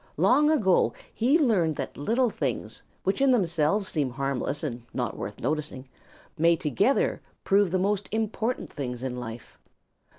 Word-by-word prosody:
Long 300 +1 +4
ago 210 - +3 0.2
he 255 +7 +3
learned 200 - +2
that - - -5
little 230 - +1
things - - -3 0.2
which 195 +6 0
in 275 - +5
themselves 185 -3 +2
seem 145 -7 -1
harmless 135 +3 -2
and 125 -5 -3
not - - -2
worth - - -6
noticing 145 -1 -3 0.5
may 170 +1 +5
together 185 - +1 0.2
prove 200 -1 +3
the 185 - +1
most 200 +1 0
important 220 +2 -2
things 125 -4 -5
in 125 -1 -3
life. 115 -1 -9
175 Hz, 145 wpm, -27 LUFS, 140-220 Hz, 0.5 s, in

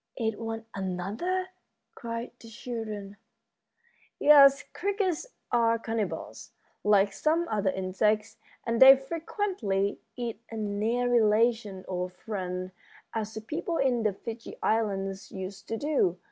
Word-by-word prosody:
"Eat 225 -3 -1
one 225 0 -4
another?" 200 - -2 0.4
cried 230 -1 -5
the 230 - -12
children. 215 -3 -6 1.0
"Yes, 280 -1 +7
crickets 395 0 -1 0.2
are 230 -1 +3
cannibals, 225 -2 -4 0.3
like 200 -1 +4
some 320 - +1
other 205 -3 +1
insects, 210 +4 0 0.3
and 230 +1 0
they 265 +1 +11
frequently 270 - -2 0.2
eat 235 -3 -4
a 225 - -6
near 215 +4 0
relation 220 -3 +2
or 180 -1 -2
a - - -15
friend, 185 -1 -5 0.4
as 220 -1 -3
the 220 - -4
people 330 +8 -3
in 255 -3 +2
the 215 -2 +1
Fiji 230 +3 -8
Islands 195 -3 -1
used 190 +1 -7
to 225 - -2
do. 275 - +1
225 Hz, 125 wpm, -28 LUFS, 200-245 Hz, 1.0 s, they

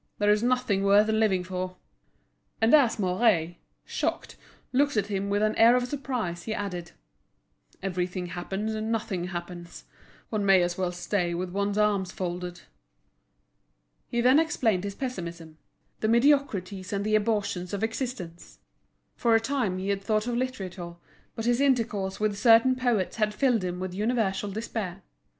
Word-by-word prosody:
There 205 0 +3
is 210 0 +3
nothing 245 -5 +1
worth 205 +2 +5
living 215 -4 +2
for." 185 0 -4 0.8
And 225 +4 +3
as 280 -7 +5
Mouret, 180 -4 +1 0.3
shocked, - - -3 0.4
looked 285 -1 +2
at 205 - +2
him 200 0 -1
with 205 +1 +1
an 215 0 +1
air 230 +2 +7
of 250 0 +1
surprise, 245 -11 -3
he 220 +2 -4
added: 180 -4 -5 0.9
"Everything 180 -1 -2
happens 195 +5 -4
and 220 +1 -3
nothing 210 -6 -2
happens; 175 -1 -7 0.5
one 215 -2 0
may 195 -2 +5
as 175 0 -1
well 185 -1 -1
stay 175 0 -1
with 180 +1 -3
one's 200 +1 -1
arms 205 -3 +1
folded." 180 -1 -5 1.5
He 235 - -1
then 255 +5 +6
explained 225 - +1
his 200 -1 -5
pessimism—the 170 - -7
mediocrities 225 -7 +2
and 200 0 -2
the 215 - 0
abortions 205 -4 0
of 200 +1 -3
existence. 220 -8 -5 0.6
For 230 -2 +3
a - - +5
time 225 -6 -1
he 190 +2 -3
had 200 -1 0
thought 215 +1 0
of 240 -1 -2
literature, 190 -9 -4 0.4
but 225 - -4
his 240 +2 +2
intercourse 225 -8 +1
with 210 -1 0
certain 230 +3 +6
poets 240 -7 0
had 215 -1 0
filled 240 -5 +2
him 180 0 -3
with 185 -1 -4
universal 205 -1 0
despair. 200 -3 -5
205 Hz, 155 wpm, -27 LUFS, 185-230 Hz, 1.5 s, air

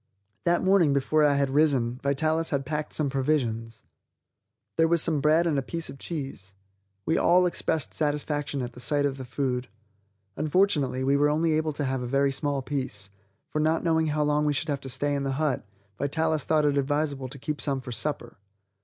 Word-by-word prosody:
That 175 0 +2
morning 185 -6 +4
before 150 +3 +2
I 145 -1 +4
had 140 -1 +1
risen, 135 -5 +2
Vitalis 155 +4 +1
had 140 -2 -1
packed 150 +1 -3
some 150 - -1
provisions. 130 -5 -1 0.9
There 165 0 +4
was 170 +1 +3
some 155 -3 +1
bread 155 +3 +4
and 155 -4 +1
a - - -1
piece 165 +4 -4
of 135 - -12
cheese. 135 - -6 0.5
We 160 - +2
all 180 +1 +4
expressed 160 -3 -1
satisfaction 145 -2 -1
at 120 0 -6
the 125 - -12
sight 145 +2 +1
of 135 -1 -1
the 130 - -7
food. 125 -1 -2 0.7
Unfortunately, 150 -6 +1
we 140 +1 +3
were 145 +1 +3
only 160 +2 +2
able 155 0 +1
to 145 0 -2
have 130 -1 -1
a 125 - -3
very 140 +2 +2
small 140 0 -2
piece, 125 -8 -3 0.4
for 155 - -3
not 160 +1 +1
knowing 160 -1 +2
how 150 0 +1
long 150 0 +1
we 150 - +2
should 155 +3 -2
have 140 -1 -1
to 135 - -7
stay 145 +3 -1
in 140 - -1
the 135 -1 -1
hut, 140 -6 -1 0.3
Vitalis 155 +1 0
thought 155 -1 +2
it 145 -1 +2
advisable 140 -1 -1
to 130 - -8
keep 150 +2 -4
some 140 -2 0
for 125 -1 -8
supper. 120 +1 -3
145 Hz, 200 wpm, -27 LUFS, 135-155 Hz, 0.9 s, morning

